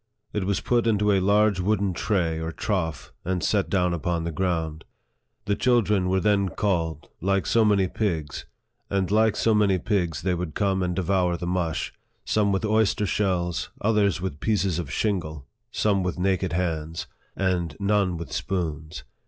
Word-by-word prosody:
It 105 -3 -1
was 100 0 0
put 120 -1 +1
into 105 -2 +3
a 100 - +4
large 100 +1 +3
wooden 100 0 +1
tray 85 -4 0
or 80 0 -3
trough, 80 - -3
and 90 0 -2
set 100 -2 +1
down 90 -3 +1
upon 85 0 -1
the 85 - -2
ground. 80 -2 -2 0.6
The 100 - +1
children 105 -7 +2
were 95 +1 +2
thej 100 -2 +1
called, 85 -7 -1
like 95 +2 +1
so 115 - +3
many 100 -3 +3
pigs, 80 -9 -3 0.4
and 95 -1 0
like 110 0 +3
so 115 - +2
many^pigsfthey 95 -4 +1
would 85 -3 -4
come 95 -2 +1
and 90 -1 -1
devour 90 -2 +1
the 85 - -5
mush; 85 -2 -1 0.3
some 105 -2 +2
with 95 +2 0
oyster 110 -1 +2
shells, 90 -4 -1
others 105 -5 +2
with 90 -5 -4
pieces 95 -4 0
of 75 -6 -5
shingle, 80 -9 -2 0.2
some 105 -3 +1
with 90 -1 -2
naked 95 -1 0
hands, 80 -2 -2 0.3
and 90 -5 -1
none 100 -3 +1
with 85 - -7
spoons. 80 -4 -3
95 Hz, 160 wpm, -25 LUFS, 85-100 Hz, 0.6 s, a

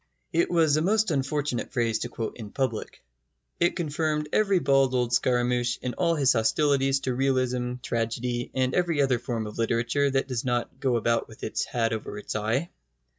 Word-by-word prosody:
It 170 +1 +2
was 160 -4 +3
a - - +2
most 210 +2 +2
unfortunate 140 -2 -1
phrase 115 -4 0
to - - -4
quote 115 - -4
in 110 -3 -8
public. 130 -3 -3 0.6
It 170 - +2
confirmed 150 -2 -1
every 200 -3 +3
bald 135 -5 +3
old 120 -1 0
scaramouch 120 0 +1
in 125 - -2
all 170 -2 +1
his 135 -4 +4
hostilities 135 +4 +2
to 130 - -1
realism, 125 -1 0
tragedy, 120 +1 -2
and 130 -1 +1
every 170 -4 +1
other 135 -4 +3
form 115 -2 -3
of 105 +2 -8
literature 115 +5 +1
that 135 0 0
does 125 -4 -2
not 120 +1 -2
go 130 -3 +1
about 115 0 +1
with - - -14
its - - -1
hat 115 -2 -1
over 105 -2 -5
its 105 - -6
eye. 115 +10 -1
130 Hz, 180 wpm, -26 LUFS, 120-145 Hz, 0.6 s, his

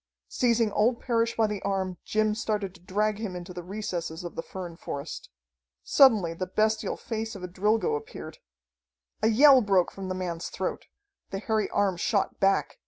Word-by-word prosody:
Seizing 235 -3 +2
old 230 +4 +2
Parrish 230 -1 0
by 225 - +4
the 210 -2 -3
arm, 190 -2 -2
Jim 215 0 +1
started 210 -3 -2
to 180 - -17
drag 210 +3 0
him 205 -5 -4
into 180 +1 -7
the 175 - -6
recesses 180 -3 -4
of 175 - -6
the - - -2
fern 175 -1 -7
forest. 140 -3 -6 0.5
Suddenly 215 -12 +5
the 185 +2 -4
bestial 215 +3 0
face 225 -1 -4
of 190 - -9
a - - -3
Drilgo 210 - +1
appeared. 445 +2 -8 0.8
A 215 - +3
yell 265 +4 +7
broke 195 -5 +2
from 195 -1 -7
the 185 - -2
man's 175 -2 -4
throat. - - -4 0.4
The 195 - -4
hairy 215 +1 0
arm 200 -3 +1
shot 200 +3 0
back. 195 - +1
205 Hz, 175 wpm, -27 LUFS, 185-220 Hz, 0.8 s, yell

